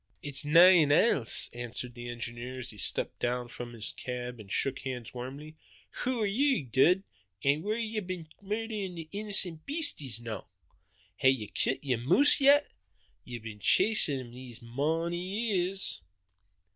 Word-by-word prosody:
"It's 140 Hz, -1 st, -4 dB
nane 165 Hz, 0 st, +7 dB
else," 145 Hz, -, +3 dB
answered 120 Hz, +1 st, -5 dB
the 120 Hz, 0 st, -8 dB
engineer 120 Hz, +1 st, -6 dB
as 125 Hz, -1 st, -6 dB
he 105 Hz, -, -14 dB
stepped -, -, 0 dB
down 120 Hz, 0 st, -2 dB
from 120 Hz, 0 st, -8 dB
his 110 Hz, -3 st, -4 dB
cab 125 Hz, -1 st, -6 dB
and 100 Hz, -3 st, -11 dB
shook 135 Hz, -1 st, +1 dB
hands 125 Hz, -4 st, -6 dB
warmly. 140 Hz, +5 st, -8 dB, 0.4 s
"Hoo 250 Hz, -2 st, -1 dB
are -, -, +2 dB
ye, 255 Hz, -, +1 dB
Dud, 145 Hz, -, +3 dB, 0.4 s
an' 140 Hz, +2 st, +2 dB
whaur 210 Hz, +4 st, -1 dB
hae 230 Hz, -, -2 dB
ye 220 Hz, -1 st, -3 dB
been 180 Hz, -4 st, -6 dB
murderin' 210 Hz, -2 st, -4 dB
the 165 Hz, -2 st, -7 dB
innocent 195 Hz, -6 st, +1 dB
beasties 275 Hz, -, -1 dB
noo? 115 Hz, -4 st, -6 dB, 0.8 s
Hae 130 Hz, -, +4 dB
ye 130 Hz, -5 st, 0 dB
kilt 135 Hz, -, 0 dB
yer 130 Hz, -4 st, 0 dB
moose 180 Hz, -, +5 dB
yet? 285 Hz, +2 st, +5 dB, 0.5 s
Ye've 120 Hz, -2 st, -8 dB
been 110 Hz, -2 st, -8 dB
chasin' 185 Hz, -, +3 dB
him 120 Hz, -2 st, -9 dB
these 125 Hz, -1 st, -10 dB
mony 160 Hz, +8 st, -2 dB, 0.3 s
years." 190 Hz, -, -1 dB
140 Hz, 160 wpm, -30 LUFS, 120-195 Hz, 0.8 s, nane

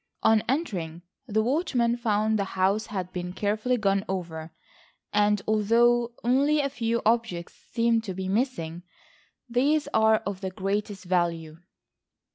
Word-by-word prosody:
On 220 Hz, -1 st, +5 dB
entering 180 Hz, -, -2 dB, 0.2 s
the 220 Hz, -1 st, +1 dB
watchman 245 Hz, -3 st, +1 dB
found 220 Hz, -2 st, +1 dB
the -, -, +2 dB
house 195 Hz, +3 st, +2 dB
had 185 Hz, -3 st, -5 dB
been 180 Hz, 0 st, -4 dB
carefully 215 Hz, +6 st, 0 dB
gone 195 Hz, -3 st, +1 dB
over, 165 Hz, -4 st, -4 dB, 0.6 s
and 210 Hz, -1 st, +2 dB
although 235 Hz, +3 st, +3 dB
only 275 Hz, +5 st, +3 dB
a 280 Hz, -1 st, 0 dB
few 235 Hz, -2 st, -1 dB
objects 225 Hz, -6 st, 0 dB, 0.2 s
seem 230 Hz, -1 st, +2 dB
to 195 Hz, -5 st, -6 dB
be 190 Hz, 0 st, -4 dB
missing, 190 Hz, -7 st, -1 dB, 0.7 s
these 280 Hz, +6 st, +1 dB
are 220 Hz, 0 st, +5 dB
of 200 Hz, -1 st, -4 dB
the 190 Hz, -, -2 dB
greatest 200 Hz, +2 st, -3 dB
value. 170 Hz, -3 st, -1 dB
215 Hz, 135 wpm, -26 LUFS, 185-235 Hz, 0.7 s, On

